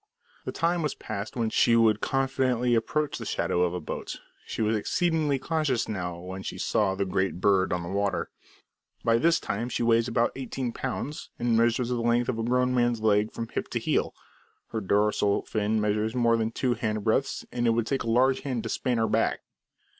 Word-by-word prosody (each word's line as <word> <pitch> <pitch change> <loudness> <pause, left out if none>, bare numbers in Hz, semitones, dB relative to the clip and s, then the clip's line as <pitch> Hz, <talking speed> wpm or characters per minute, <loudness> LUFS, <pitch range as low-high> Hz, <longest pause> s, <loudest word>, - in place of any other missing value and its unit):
The - - -2
time 170 +1 0
was 150 -3 -1
past 105 0 -6
when 115 -3 -1
she 115 - +4
would 115 -2 +4
confidently 130 -2 +1
approach 145 +6 0
the - - -5
shadow 90 - 0
of 90 0 +1
a - - -2
boat, 80 - -6 0.3
she - - -2
was 110 +1 +2
exceedingly 155 +5 +1
cautious 150 -3 0
now 90 -5 -3
when 95 +2 -7
she - - -6
saw 95 -3 +1
the 100 0 -1
"great 95 -1 -1
bird" 95 -1 +3
on 90 -1 -1
the 85 - -6
water. 100 +1 -1 0.7
By 115 0 +3
this 165 +4 +3
time 115 +5 -3
she 120 - -1
weighs 115 0 +3
about 120 0 +1
eighteen 130 -1 -4
pounds, 135 +4 -5
and 120 -1 +1
measures 115 +1 +2
the 120 -1 -1
length 120 +1 +2
of 115 -3 -1
a - - -1
grown 125 +2 +2
man's 120 -2 +1
leg 105 0 +2
from 115 - -5
hip - - -3
to - - -2
heel; - - 0 0.5
her 110 - -3
dorsal 105 +1 +2
fin 110 0 0
measures 105 +2 0
more 120 -2 +3
than 110 -1 0
two 125 +2 0
hand 110 -3 -2
breadths, 130 +6 0
and 120 -1 0
it 115 - +3
would 115 -1 +1
take 135 +3 -1
a 115 - -3
large 130 +3 +3
hand 125 -5 -3
to - - -4
span 125 -3 -1
her 110 0 +2
back. - - +1
115 Hz, 205 wpm, -27 LUFS, 105-125 Hz, 0.7 s, she